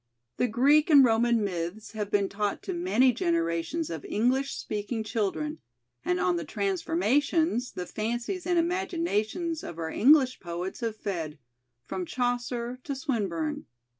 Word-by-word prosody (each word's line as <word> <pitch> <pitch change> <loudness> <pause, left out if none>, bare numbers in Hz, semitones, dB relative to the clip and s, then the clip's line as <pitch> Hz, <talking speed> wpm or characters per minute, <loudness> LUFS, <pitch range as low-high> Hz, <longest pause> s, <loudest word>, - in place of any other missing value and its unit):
The 250 - +2
Greek 280 +8 +4
and 280 -4 +8
Roman 230 -1 +3
myths 185 +2 -4
have 210 -2 -4
been 200 -1 +2
taught 205 +1 -2
to 375 - -3
many 340 -8 +3
generations 170 - -1
of 160 - -5
English 260 +5 +1
speaking 215 +2 -3
children, 225 +9 -2 0.4
and 180 0 0
on 180 -1 +2
the 170 - -3
"transformations" 225 - +1
the 180 - -4
fancies 240 - -3
and 350 -1 +2
imaginations 335 - -1
of 165 - -7
our 160 -1 -3
English 265 0 +5
poets 175 +1 -5
have 230 -2 -2
fed, 165 -7 -4 0.5
from 180 +6 -4
Chaucer 245 0 -2
to 280 - -3
Swinburne. 200 - -2
225 Hz, 140 wpm, -28 LUFS, 190-275 Hz, 0.5 s, and